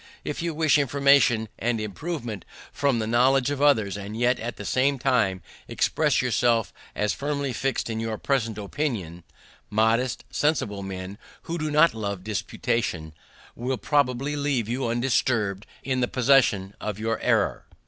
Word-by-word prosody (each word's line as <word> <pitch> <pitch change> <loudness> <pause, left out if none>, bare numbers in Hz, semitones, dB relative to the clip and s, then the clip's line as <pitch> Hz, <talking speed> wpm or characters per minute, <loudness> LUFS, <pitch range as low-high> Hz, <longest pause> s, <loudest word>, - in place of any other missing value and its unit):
If - - -4
you 170 -2 -2
wish 155 -2 +3
information 140 -4 +3
and 115 0 0
improvement 115 - -5 0.3
from 140 -4 +1
the 110 - -1
knowledge 125 +4 +3
of 145 -1 -3
others, 110 -9 +3
and 100 +2 -6
yet 125 +2 +2
at 115 +1 -4
the 105 - -8
same 135 +5 +2
time 115 -8 +1 0.2
express - - +1
yourself 115 -3 +1 0.2
as 105 0 0
firmly 140 -2 -2
fix'd 135 +3 -1
in 110 -1 -3
your 110 -1 -3
present 115 -6 -1
opinions, 100 - -3 0.5
modest, 115 +4 +1
sensible 115 -10 0
men, 95 +1 -6 0.2
who 170 +1 -4
do 155 0 -2
not 150 +3 +5
love 100 -4 -4
disputation, 100 -5 -2 0.4
will 125 +2 -2
probably 140 0 0
leave 140 -6 0
you 125 +2 -2
undisturbed 115 -4 0 0.2
in 130 -1 -1
the 125 - +1
possession 120 -8 +3
of 105 -2 -3
your 115 +1 -2
error. - - +1
120 Hz, 150 wpm, -25 LUFS, 105-140 Hz, 0.5 s, not